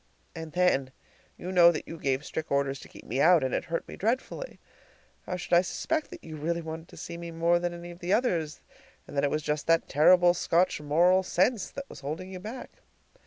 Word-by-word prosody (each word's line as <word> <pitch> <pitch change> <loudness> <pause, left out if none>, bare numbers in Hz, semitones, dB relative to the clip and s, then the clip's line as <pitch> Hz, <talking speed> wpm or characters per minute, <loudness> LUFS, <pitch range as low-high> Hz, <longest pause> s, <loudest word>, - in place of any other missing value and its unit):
And 160 -1 -7
then 160 -8 +2 0.5
you 180 - -6
know 175 -2 +7
that 155 - -5
you 165 - -8
gave 135 +1 -1
strict 160 - -5
orders 140 -1 0
to - - -12
keep - - -14
me 130 +5 -1
out; 170 -2 +6
and 130 - -1
it - - -1
hurt 165 0 -3
me - - -8
dreadfully. 255 - -3 0.7
How 180 - -2
should 180 0 -5
I 175 - +7
suspect 310 - -2
that - - -11
you 160 -1 -8
really 170 +3 -2
wanted 160 +1 -7
to - - -15
see 170 - -7
me 170 0 -7
more 170 +1 +2
than 175 0 -2
any 175 0 -8
of 175 - -13
the 180 +1 -3
others, 175 -10 0 0.5
and - - -10
that 140 - +1
it 145 - +3
was 155 +1 -2
just 150 -1 -2
that 165 0 +3
terrible 175 +4 +5
Scotch 175 -1 +1
moral 175 +6 +4
sense 190 +4 +1
that 275 0 -8
was - - -11
holding 155 +7 -5
you 185 - -7
back? 220 +7 -8
170 Hz, 225 wpm, -28 LUFS, 155-180 Hz, 0.7 s, know